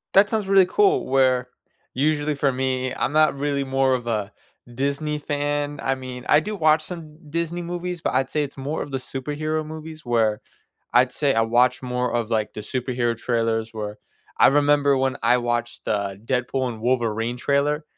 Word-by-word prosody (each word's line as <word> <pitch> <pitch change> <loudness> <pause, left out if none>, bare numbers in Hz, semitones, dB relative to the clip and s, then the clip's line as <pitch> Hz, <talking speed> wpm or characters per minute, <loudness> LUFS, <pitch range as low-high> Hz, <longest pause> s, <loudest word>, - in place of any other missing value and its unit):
That 200 +1 +6
sounds 215 -3 -1
really 195 -1 +6
cool, 400 - +2
where 130 -2 +3 0.4
usually 150 +2 +1
for 140 -2 +1
me, 130 0 -1
I'm - - -1
not 155 -2 +3
really 140 -1 -1
more 135 0 +2
of 120 -2 -2
a 105 -3 -1 0.4
Disney 140 +3 -1
fan, 145 0 -2
I 135 - +1
mean, 130 -1 -8
I 150 - +7
do 210 +7 -4
watch 155 -3 +3
some 160 -4 -8
Disney 170 +2 -2
movies, 175 0 -4
but - - -2
I'd 130 0 +1
say 150 - 0
it's 140 -1 -5
more 145 +4 -3
of 145 - -6
the 135 - -1
superhero 150 +4 -3
movies, 155 -1 -9
where 115 -3 +1 0.5
I'd 125 +1 +5
say 140 +1 +1
I 115 - +3
watch 120 +3 +2
more 125 -1 -1
of, 120 -2 -1
like, 110 -1 0
the 105 - -6
superhero 120 0 -1
trailers, 115 -2 -1
where 105 -1 -5 0.4
I - - +7
remember 145 0 +4
when 130 0 0
I 120 +2 +4
watched 120 0 -2
the 100 -2 -2
"Deadpool& 125 -2 -1
Wolverine" 120 -1 0
trailer, 145 +4 0
135 Hz, 180 wpm, -23 LUFS, 120-150 Hz, 0.5 s, I